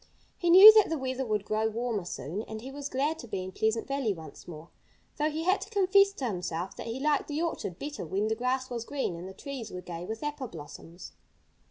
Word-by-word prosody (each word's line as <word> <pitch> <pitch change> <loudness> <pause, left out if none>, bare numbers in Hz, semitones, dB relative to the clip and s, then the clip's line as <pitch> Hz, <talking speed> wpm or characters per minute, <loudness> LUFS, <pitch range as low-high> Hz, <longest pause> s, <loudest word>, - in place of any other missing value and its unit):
He 350 - -1
knew 390 +5 +12
that 430 -2 +5
the 325 - -1
weather 260 -1 -2
would 210 -2 -1
grow 215 +1 0
warmer 225 -3 -2
soon; 175 +3 -5
and 220 - -6
he 260 +3 -8
was 285 0 -6
glad 290 +5 -1
to 240 - -9
be 195 -4 -3
in 185 - -7
Pleasant 220 +4 0
Valley 275 -6 0
once 160 -2 -12
more, 165 -1 -10 0.5
though 300 +1 +1
he 315 +1 -3
had 370 +3 +2
to - - -7
confess 395 -1 +4
to 275 - -4
himself 180 -3 -4
that - - -7
he 230 +3 -4
liked 295 0 +1
the 295 0 -3
orchard 195 - -3
better 290 +5 -6
when 195 +6 -1
the 220 - +1
grass 255 +3 -1
was 235 -2 -3
green 270 -8 -3
and 175 +2 -8
the - - -10
trees 270 -6 -7
were 180 - -6
gay 175 -1 -7
with 220 +7 -6
apple 295 -3 -3
blossoms. 165 0 -11
240 Hz, 235 wpm, -29 LUFS, 190-295 Hz, 0.5 s, knew